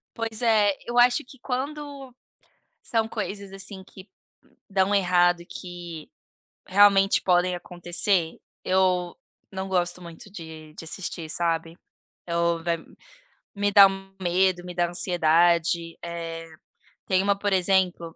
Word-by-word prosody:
Pois 225 Hz, 0 st, -1 dB
é, 215 Hz, -3 st, +4 dB
eu 240 Hz, +1 st, -1 dB
acho 245 Hz, +4 st, +4 dB
que 265 Hz, 0 st, -16 dB
quando, 275 Hz, 0 st, -5 dB, 0.7 s
são 225 Hz, -1 st, -1 dB
coisas, 200 Hz, -3 st, -5 dB
assim, 195 Hz, 0 st, -4 dB
que 190 Hz, +1 st, -14 dB, 0.6 s
dão 195 Hz, +1 st, +1 dB
errado 175 Hz, -2 st, +3 dB
e -, -, -13 dB
que 175 Hz, 0 st, -9 dB, 0.6 s
realmente 195 Hz, 0 st, +5 dB
podem 180 Hz, 0 st, +2 dB
acontecer. 175 Hz, 0 st, -1 dB, 0.3 s
Eu 185 Hz, -2 st, +1 dB, 0.4 s
não 190 Hz, 0 st, -4 dB
gosto 180 Hz, -1 st, -1 dB
muito 170 Hz, +5 st, -12 dB
de 160 Hz, -4 st, -10 dB
de -, -, -9 dB
assistir, 165 Hz, -1 st, -4 dB
sabe? 165 Hz, 0 st, -1 dB, 0.5 s
Ou 170 Hz, 0 st, 0 dB
vai 170 Hz, -1 st, -1 dB, 0.8 s
me 205 Hz, 0 st, 0 dB
dá 200 Hz, -1 st, +9 dB
um 195 Hz, 0 st, -5 dB
medo, 180 Hz, 0 st, +1 dB
me 180 Hz, -1 st, -8 dB
dá 175 Hz, -1 st, +1 dB
ansiedade, 170 Hz, -1 st, +2 dB
eh. 165 Hz, -1 st, -6 dB, 0.6 s
Tem 190 Hz, 0 st, +2 dB
uma, 200 Hz, 0 st, +2 dB
por 205 Hz, 0 st, -2 dB
exemplo, 180 Hz, -3 st, +1 dB
185 Hz, 130 wpm, -25 LUFS, 170-200 Hz, 0.8 s, dá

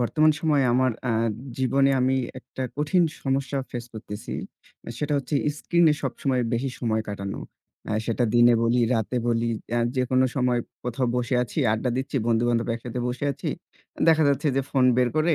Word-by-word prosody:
বর্তমান 155 Hz, +6 st, +3 dB
সময়ে 150 Hz, -4 st, +2 dB
আমার, 130 Hz, 0 st, +3 dB, 0.2 s
আ -, -, +2 dB, 0.5 s
জীবনে 135 Hz, +1 st, +3 dB
আমি 130 Hz, +1 st, +2 dB, 0.2 s
একটা 130 Hz, +1 st, -8 dB
কঠিন 150 Hz, +5 st, +2 dB, 0.2 s
সমস্যা 135 Hz, +1 st, 0 dB
face 120 Hz, 0 st, -6 dB
করতেছি। 105 Hz, -1 st, -7 dB, 0.7 s
সেটা 150 Hz, +2 st, -2 dB
হচ্ছে 140 Hz, +1 st, -4 dB, 0.2 s
screen-এ 170 Hz, -1 st, +3 dB
সবসময় 130 Hz, -1 st, -1 dB
বেশি 125 Hz, +3 st, 0 dB
সময় 110 Hz, -2 st, 0 dB
কাটানো। 100 Hz, -1 st, -5 dB, 0.5 s
অ্যা 105 Hz, -, -2 dB
সেটা 120 Hz, +1 st, +1 dB
দিনে 120 Hz, 0 st, +6 dB
বলি, 115 Hz, +1 st, +2 dB
রাতে 115 Hz, +2 st, -1 dB
বলি, 115 Hz, 0 st, +1 dB, 0.2 s
অ্যা 120 Hz, 0 st, +1 dB, 0.2 s
যে 130 Hz, -, +3 dB
কোনো 130 Hz, 0 st, +4 dB
সময় 125 Hz, -3 st, +1 dB, 0.2 s
কোথাও 125 Hz, +1 st, -1 dB
বসে 125 Hz, +1 st, 0 dB
আছি, 125 Hz, -, -5 dB
আড্ডা 110 Hz, +3 st, -1 dB
দিচ্ছি, 135 Hz, +1 st, -3 dB
বন্ধু-বান্ধব 120 Hz, 0 st, +2 dB
একসাথে 120 Hz, +1 st, -5 dB
বসে 125 Hz, +3 st, -3 dB
আছি। -, -, -5 dB, 0.6 s
দেখা 160 Hz, -1 st, +5 dB
যাচ্ছে 140 Hz, +2 st, +1 dB
যে, -, -, +4 dB
phone 130 Hz, -2 st, +4 dB
বের 125 Hz, -1 st, +3 dB
করে 160 Hz, +1 st, +3 dB
125 Hz, 170 wpm, -25 LUFS, 120-140 Hz, 0.7 s, দিনে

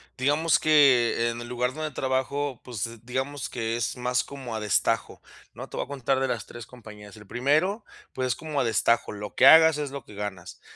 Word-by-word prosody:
digamos 145 Hz, +5 st, +2 dB
que, 130 Hz, -6 st, +4 dB
en 120 Hz, 0 st, -7 dB
el 120 Hz, -, -8 dB
lugar 125 Hz, +1 st, -2 dB
donde 155 Hz, 0 st, -4 dB
trabajo, 130 Hz, 0 st, -2 dB
pues, 115 Hz, -1 st, -6 dB
digamos 130 Hz, +2 st, -4 dB
que 115 Hz, -1 st, -3 dB
es 120 Hz, -, -3 dB
más 125 Hz, 0 st, 0 dB
como 130 Hz, -4 st, -8 dB
a -, -, -3 dB
destajo, 105 Hz, -2 st, -1 dB, 0.3 s
¿no? -, -, -8 dB
Te -, -, -9 dB
voy -, -, -2 dB
a -, -, -23 dB
contar 135 Hz, -1 st, -1 dB
de 135 Hz, -, 0 dB
las 120 Hz, -4 st, -3 dB
3 120 Hz, -1 st, -10 dB
compañías. 105 Hz, -3 st, -13 dB
El 105 Hz, -, -14 dB
primero, 150 Hz, -, 0 dB, 0.3 s
pues, 130 Hz, 0 st, -2 dB
es 125 Hz, -, 0 dB
como 150 Hz, -3 st, -3 dB
a -, -, +1 dB
destajo, 115 Hz, +1 st, +1 dB
lo 105 Hz, 0 st, -7 dB
que 130 Hz, -, +5 dB
hagas 160 Hz, 0 st, +7 dB
es 145 Hz, -2 st, -3 dB
lo 140 Hz, 0 st, -7 dB
que 105 Hz, -, -14 dB
ganas. 100 Hz, -3 st, -7 dB
125 Hz, 210 wpm, -26 LUFS, 115-140 Hz, 0.3 s, hagas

